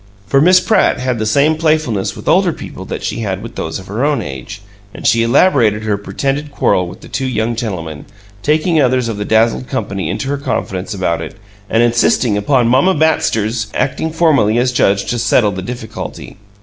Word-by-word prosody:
For 135 +7 +2
Miss 180 +3 +6
Pratt 205 +2 +2
had 130 -2 -1
the 110 - -1
same 140 +8 +3
playfulness 155 -11 0
with - - -11
older - - +4
people - - -9
that - - -6
she - - -3
had 100 -3 -3
with 115 - -8
those 80 0 -4
of 95 - -10
her 105 +7 -3
own 145 -2 +1
age; 85 - -7 0.3
and - - -9
she 115 -1 +4
elaborated 115 - +3
her 105 -1 0
pretended 135 +9 -3
quarrel 90 -9 +1
with 85 - -11
the - - -12
two 135 -1 -3
young 120 -2 -1
gentlemen, 85 - -5 0.4
taking 155 - +2
others 125 -2 +2
of 115 -3 -3
the 105 - -3
dazzled 115 +3 +2
company 95 - -3
into 135 +9 -3
her 140 0 -1
confidence 105 -8 -3
about 90 -3 -1
it, - - -7 0.3
and 115 +1 +3
insisting 120 -1 +2
upon 120 +4 +2
"Mamma 135 +10 +3
Batster's" 115 -8 +1
acting 160 +4 -1
formally 150 -10 +2
as 125 +1 +2
judge 100 -5 +2
to 120 - -2
settle 115 -2 +3
the 95 -1 -5
difficulty. 110 0 -7
115 Hz, 195 wpm, -16 LUFS, 105-140 Hz, 0.4 s, Miss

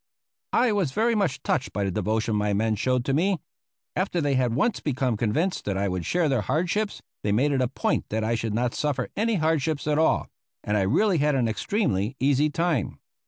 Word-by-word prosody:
I 245 -1 +3
was 190 -10 0
very 230 +6 +2
much 170 -11 0
touched 135 - -1
by 100 - -1
the 95 - -1
devotion 110 +3 0
my 105 0 +1
men 110 +2 +1
showed 125 +3 0
to 135 - 0
me. 180 +4 +1 0.6
After 185 -1 0
they 145 -3 +1
had 125 -3 +1
once 210 - +1
become 130 -4 -1
convinced 120 - 0
that 100 -2 -1
I 100 +1 0
would 90 -3 -3
share 175 -2 +2
their 135 -5 +1
hardships, 180 - -1 0.2
they 105 - -1
made 130 +8 +2
it 135 -2 +1
a 125 - +2
point 130 - -1
that 110 +1 -1
I 110 +2 0
should 115 -2 -2
not 120 +1 0
suffer 150 -3 -1
any 225 +2 +1
hardships 155 -3 0
at 150 0 +1
all; 160 - +2 0.4
and 105 - -1
I 105 - +2
really 175 - +2
had 150 0 +2
an 125 -3 +2
extremely 110 - -1
easy 140 +2 +3
time. 165 - -1
135 Hz, 210 wpm, -25 LUFS, 110-165 Hz, 0.6 s, I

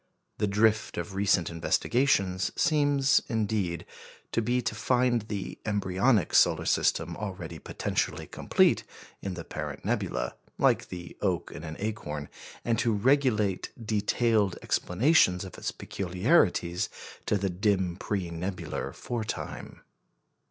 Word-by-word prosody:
The 105 - +2
drift 110 +2 +2
of 85 +3 -4
recent 95 -4 +2
investigations 95 +2 +1
seems, 145 -3 +3
indeed, 105 -6 -1 0.5
to 115 - +1
be 120 +3 +1
to 125 - -2
find 125 -2 +2
the 105 -2 -5
embryonic 100 0 +1
solar - - +4
system - - +1
already - - -6
potentially - - -2
complete - - +2 0.4
in 95 -2 -4
the 85 - -6
parent - - -6
nebula, - - -1 0.2
like - - +3
the 90 -1 -8
oak 90 -6 0
in 70 - -8
an 80 -1 -6
acorn, 75 -9 -4 0.4
and 115 -2 +1
to 115 - +2
relegate 110 -4 +2
detailed 110 -2 +1
explanations 95 - +3
of 95 - -9
its - - -2
peculiarities 90 - +1 0.4
to 105 - +2
the 100 -1 -1
dim 95 -1 +1
pre 95 -2 -3
nebular 90 +3 -4
fore 120 -2 -3
time. - - -6
100 Hz, 125 wpm, -28 LUFS, 90-115 Hz, 0.5 s, solar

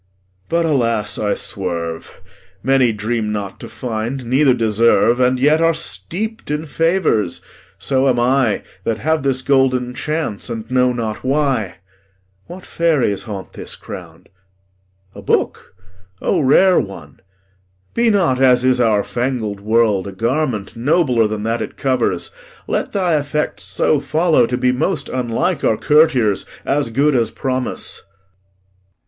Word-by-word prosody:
But, 170 0 +1
alas, 115 -8 0
I 105 -1 0
swerve; 85 -2 -4 0.4
Many 130 -1 +3
dream 110 +1 -2
not 100 -2 -5
to - - -9
find, 120 +2 -4
neither 130 +2 +3
deserve, 115 +1 +3
And 125 0 +3
yet 150 +4 +3
are 165 0 +3
steep'd 220 +7 -4
in 150 +1 -2
favours; 165 - 0 0.4
so 130 +7 +1
am 125 -2 +1
I, 125 -2 +2 0.2
That 110 +1 -1
have 160 +4 0
this 130 -1 0
golden 130 -2 +2
chance, 145 -5 -3
and 115 0 -6
know 125 0 +3
not 115 -3 -4
why. 135 -7 0 0.7
What 180 +2 -10
fairies 150 - +1
haunt 100 -2 -7
this - - -7
ground? - - -11 0.8
A - - -10
book? - - -1 0.4
O - - 0
rare 180 +7 +5
one! 85 -7 -7 0.7
Be 235 0 +2
not, 170 -12 +2
as 125 -1 +4
is 130 -1 +3
our 110 -3 +3
fangled 120 -5 -3
world, 105 -2 +1
a - - -5
garment 115 +1 -2
Nobler 125 -2 +2
than 105 -1 -4
that 115 +1 -1
it - - -6
covers. 125 -9 -1 0.3
Let - - -2
thy 180 -5 +1
effects 150 +1 -2
So 150 - +1
follow 155 -2 +2
to 125 - -2
be 125 0 +2
most 145 +2 -1
unlike 130 +7 -1
our 110 - +2
courtiers, 125 -5 +3 0.2
As 140 -3 0
good 140 +6 +2
as 115 -4 +1
promise. 130 +1 -3
125 Hz, 140 wpm, -18 LUFS, 110-145 Hz, 0.8 s, rare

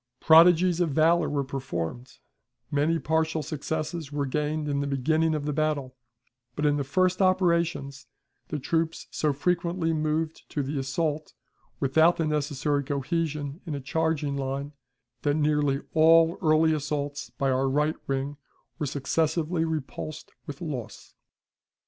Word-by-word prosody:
Prodigies 170 +2 +6
of 175 -2 +2
valor 160 +2 +3
were 145 -1 0
performed, 125 -4 -5 0.5
many 150 +3 +2
partial 160 0 0
successes 155 0 -4
were 145 -1 -1
gained 150 +2 -2
in 140 -1 0
the 140 - -1
beginning 155 +4 +1
of 150 -1 -3
the 150 - -1
battle, 145 -4 -1 0.6
but 150 - -1
in 145 0 +3
the 140 - -1
first 185 +6 +1
operations 170 -8 +1 0.4
the 150 - -3
troops 165 +3 -1
so 150 - 0
frequently 170 +2 0
moved 155 +1 -2
to 145 - -2
the 140 +1 -3
assault 150 +3 -2 0.4
without 160 +5 +4
the 165 - 0
necessary 145 -1 0
cohesion 145 +1 -2
in 155 - -3
a - - -3
charging 150 0 -1
line, 140 +1 -3 0.5
that 145 -1 +1
nearly 150 -2 +1
all 165 +1 +5
early 160 -1 +4
assaults 145 -1 -3
by 135 -2 +1
our 130 +1 +1
right 150 +3 +1
wing 135 +1 -2 0.4
were 150 - -1
successively 160 +4 0
repulsed 155 0 -5 0.2
with 145 0 -7
loss. 140 -9 -6
150 Hz, 140 wpm, -27 LUFS, 140-160 Hz, 0.6 s, Prodigies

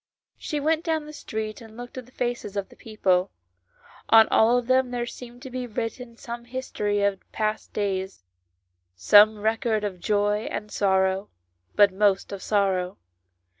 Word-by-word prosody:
She 300 - -3
went 315 +2 +1
down 320 -3 -1
the 300 - -10
street, 215 -6 -5
she 230 - -11
looked 240 +2 -10
at 255 -2 -8
the - - -19
faces 240 -5 -3
of 200 - -3
the - - -17
people; 190 -4 0 0.8
on 225 0 +8
all 230 +3 +4
of 245 - -1
them 255 0 +2
there 245 -1 -2
seemed 245 +1 -10
to 260 - -8
be 250 0 -4
written 230 +1 -5
some 235 -1 -7
history 210 -5 -2
of 200 -1 +1
past 215 0 -2
days, 190 - -3 0.7
some 205 - +6
record 220 0 0
of 195 -3 -4
joy 205 +2 0
and 210 0 -5
sorrow, 190 0 +1 0.5
but 205 -2 +5
most 195 0 +2
of 200 -1 -6
sorrow. 195 -3 0
215 Hz, 165 wpm, -25 LUFS, 200-245 Hz, 0.8 s, on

